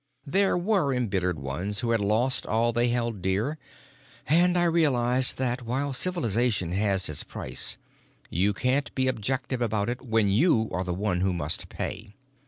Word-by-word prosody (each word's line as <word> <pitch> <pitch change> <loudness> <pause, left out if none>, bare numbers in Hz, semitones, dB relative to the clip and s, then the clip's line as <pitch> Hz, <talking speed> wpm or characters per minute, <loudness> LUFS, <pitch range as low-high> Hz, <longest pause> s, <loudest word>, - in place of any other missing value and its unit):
There 190 +5 +2
were 180 -5 +1
embittered 95 -8 -1
ones, 85 +10 -3
who 115 - -1
had 115 -2 +2
lost 110 +6 +1
all 115 +1 +1
they 120 +1 +2
held 120 -4 -1
dear, 105 - -1 0.7
and 175 +4 +3
I 175 - +3
realized 130 -7 +2
that, 125 -1 -1
while 135 +4 -2
civilization 120 - 0
has 95 0 +1
its 75 - -2
price, 65 - 0 0.5
you 95 +5 +2
can't 130 +7 0
be 130 -1 +1
objective 130 +1 -2
about 110 -2 0
it 120 - -4
when 110 -4 +1
you 110 - +3
are 90 - -2
the 90 - -4
one 95 -2 -1
who 95 0 +1
must 80 -3 -3
pay. 105 +1 -6
120 Hz, 165 wpm, -26 LUFS, 100-130 Hz, 0.7 s, and